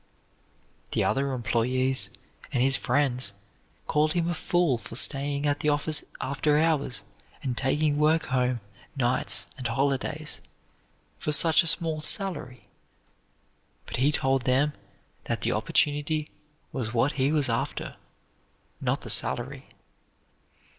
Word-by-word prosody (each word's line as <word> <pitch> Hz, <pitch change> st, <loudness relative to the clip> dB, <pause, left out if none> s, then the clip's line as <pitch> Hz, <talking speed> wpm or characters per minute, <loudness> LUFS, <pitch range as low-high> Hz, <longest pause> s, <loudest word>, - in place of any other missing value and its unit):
The -, -, +2 dB
other 135 Hz, 0 st, +1 dB
employees 130 Hz, +2 st, 0 dB, 0.4 s
and 125 Hz, -, +1 dB
his 135 Hz, 0 st, +4 dB
friends 130 Hz, -8 st, +1 dB, 0.5 s
called 155 Hz, +1 st, +2 dB
him 170 Hz, -1 st, 0 dB
a 175 Hz, -, 0 dB
fool 170 Hz, -6 st, +1 dB
for 115 Hz, -, -9 dB
staying 140 Hz, +2 st, +1 dB
at 145 Hz, 0 st, +1 dB
the 150 Hz, -, +1 dB
office 150 Hz, +1 st, +1 dB, 0.2 s
after 145 Hz, +2 st, +1 dB
hours 145 Hz, -9 st, +1 dB, 0.4 s
and 130 Hz, -3 st, -2 dB
taking 145 Hz, +3 st, +1 dB
work 155 Hz, +1 st, +3 dB
home 125 Hz, -2 st, 0 dB, 0.3 s
nights 125 Hz, -2 st, +1 dB
and 125 Hz, -, -2 dB
holidays, 140 Hz, +5 st, -1 dB, 0.8 s
for 150 Hz, -, -2 dB
such 160 Hz, +2 st, +6 dB
a 170 Hz, -, -2 dB
small 160 Hz, -2 st, +1 dB
salary; 130 Hz, -, -1 dB, 1.2 s
but -, -, -5 dB
he 135 Hz, +4 st, +3 dB
told 135 Hz, -3 st, +1 dB
them 135 Hz, +3 st, +2 dB, 0.5 s
that -, -, -2 dB
the -, -, 0 dB
opportunity 150 Hz, +1 st, 0 dB, 0.4 s
was 120 Hz, -3 st, -4 dB
what 125 Hz, +5 st, +3 dB
he 140 Hz, -1 st, +1 dB
was 150 Hz, -3 st, +2 dB
after, 115 Hz, -, -2 dB, 0.9 s
not -, -, 0 dB
the -, -, -4 dB
salary. -, -, +1 dB
140 Hz, 125 wpm, -27 LUFS, 130-150 Hz, 1.2 s, such